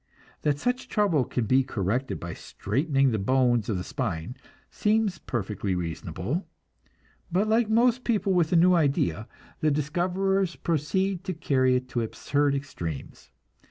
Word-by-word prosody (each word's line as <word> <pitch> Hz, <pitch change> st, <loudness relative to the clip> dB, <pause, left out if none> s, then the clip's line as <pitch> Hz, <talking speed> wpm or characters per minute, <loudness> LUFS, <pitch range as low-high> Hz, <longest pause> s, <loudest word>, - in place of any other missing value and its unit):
That 145 Hz, -2 st, +1 dB
such 245 Hz, -, -1 dB
trouble 195 Hz, -, +2 dB
can 120 Hz, -, -2 dB
be 130 Hz, +4 st, +4 dB
corrected 120 Hz, +2 st, -2 dB
by 85 Hz, 0 st, -6 dB
straightening 135 Hz, +4 st, 0 dB
the 110 Hz, -, 0 dB
bones 120 Hz, 0 st, +2 dB
of 105 Hz, -, 0 dB
the 90 Hz, -, -3 dB
spine, 85 Hz, +8 st, -3 dB, 0.4 s
seems 210 Hz, -5 st, +1 dB
perfectly 100 Hz, -4 st, -3 dB
reasonable; 90 Hz, -, -3 dB, 0.8 s
but 190 Hz, +5 st, +2 dB
like 220 Hz, 0 st, +2 dB
most 240 Hz, +2 st, +3 dB
people 210 Hz, -4 st, +1 dB
with 170 Hz, -3 st, +2 dB
a -, -, +3 dB
new 180 Hz, +2 st, +6 dB
idea, 135 Hz, -, +1 dB, 0.3 s
the 155 Hz, -, +2 dB
discoverers 180 Hz, +6 st, 0 dB
proceed 180 Hz, +4 st, -1 dB
to 185 Hz, -3 st, -3 dB
carry 130 Hz, -5 st, +2 dB
it 125 Hz, 0 st, -1 dB
to 120 Hz, -, -1 dB
absurd 140 Hz, +5 st, 0 dB
extremes. 85 Hz, -, -6 dB
145 Hz, 145 wpm, -27 LUFS, 115-185 Hz, 0.8 s, new